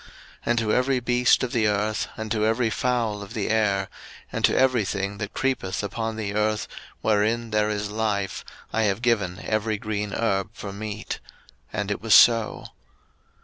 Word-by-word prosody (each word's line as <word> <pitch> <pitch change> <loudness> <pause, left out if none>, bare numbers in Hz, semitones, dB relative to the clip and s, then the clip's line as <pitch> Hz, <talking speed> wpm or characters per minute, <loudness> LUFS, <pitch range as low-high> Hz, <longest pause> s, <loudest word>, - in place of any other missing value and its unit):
01:001:030 - - -18 0.4
And 120 - +2
to 110 -2 0
every 130 +1 +2
beast 125 +1 +3
of 125 - -2
the 115 -5 +2
earth, 105 +1 0
and 110 -1 -5
to 105 -1 +1
every 115 +2 +2
fowl 115 -2 0
of 100 +3 -9
the 105 - -1
air, 100 -3 +2 0.4
and - - -3
to - - +2
every 130 -4 +3
thing 100 +1 -3
that 100 -2 -5
creepeth 130 -8 -1
upon 110 +3 -3
the 105 -2 -3
earth, 105 0 0 0.3
wherein 110 +2 +1
there 105 0 +2
is 105 -1 -2
life, 105 -3 -1 0.3
I 110 - +2
have 100 +5 -2
given 100 -7 +1
every 110 0 0
green 105 0 -3
herb 95 -4 0
for 100 -1 -7
meat: 105 +1 -5 0.5
and 105 +1 -2
it 105 - -3
was 110 -1 +5
so. 115 -2 +5
110 Hz, 180 wpm, -25 LUFS, 100-115 Hz, 0.5 s, was